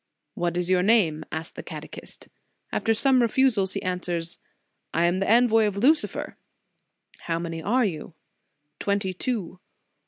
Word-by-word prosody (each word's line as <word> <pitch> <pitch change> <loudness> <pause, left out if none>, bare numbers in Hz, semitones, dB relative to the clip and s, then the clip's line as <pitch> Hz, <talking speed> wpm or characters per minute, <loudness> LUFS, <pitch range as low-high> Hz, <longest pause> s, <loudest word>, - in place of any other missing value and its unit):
What 175 0 -2
is 180 -1 -1
your 185 -1 +3
name? 180 -7 +3
asks 160 +1 -4
the - - -7
catechist. - - -10 0.4
After 225 - 0
some 260 +4 +3
refu 245 +3 +3
sals, 195 -2 -1
he - - -3
answers: 175 -2 -3 0.6
I 165 +1 +3
am 175 +2 +1
the 195 - -1
envoy 225 -1 +5
of 200 -1 -3
Lucifer. 295 +9 +1 0.9
How 165 -1 0
many 165 -1 -4
are 235 +8 +2
you? 165 -3 -5 0.6
Twenty 200 -2 -1
two. 190 -3 -3
190 Hz, 150 wpm, -25 LUFS, 170-225 Hz, 0.9 s, envoy